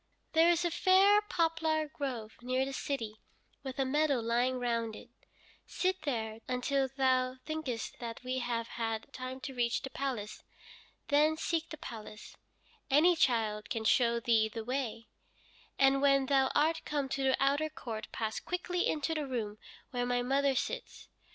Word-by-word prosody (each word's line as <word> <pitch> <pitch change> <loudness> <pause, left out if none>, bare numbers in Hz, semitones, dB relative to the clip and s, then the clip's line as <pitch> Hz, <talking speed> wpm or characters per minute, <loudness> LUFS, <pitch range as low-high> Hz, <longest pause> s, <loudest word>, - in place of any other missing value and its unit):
There 325 +1 +6
is 345 0 +2
a 345 - +1
fair 385 +4 +5
poplar 325 -5 0
grove 250 -7 -5
near 255 +2 0
the 275 - -5
city, 225 -7 -4 0.4
with 265 -2 -6
a 270 - +1
meadow 290 0 +2
lying 240 +3 +1
round 230 -3 -1
it. - - -12 0.6
Sit 375 0 -1
there 220 -5 -2
until 265 +2 0
thou 255 -1 +1
thinkest 310 -8 -4
that 230 0 -6
we 255 +1 -2
have 235 -2 -2
had 225 -1 -4
time 255 0 -6
to 285 -2 -5
reach 240 -1 0
the 270 - -6
palace. 250 -7 -4 0.7
Then 305 +2 +4
seek 330 0 -1
the 310 - -7
palace 225 -7 -9 0.5
any 315 +6 +5
child 220 -7 +1
can 225 -2 -2
show 235 +1 +3
thee 225 -2 +3
the 225 0 -5
way 245 -3 -3 0.7
and 275 0 +4
when 275 -1 +4
thou 265 -1 +3
art 320 +2 +3
come 290 -2 -1
to 270 +1 -2
the 265 -1 +3
outer 285 +3 +2
court 230 -7 -6
pass 220 -1 -2
quickly 360 0 -1
into 310 +1 0
the 305 -3 -2
room 215 -5 -3 0.3
where 245 -1 -1
my 245 0 +1
mother 275 +1 +2
sits. - - -4
265 Hz, 165 wpm, -32 LUFS, 235-305 Hz, 0.7 s, There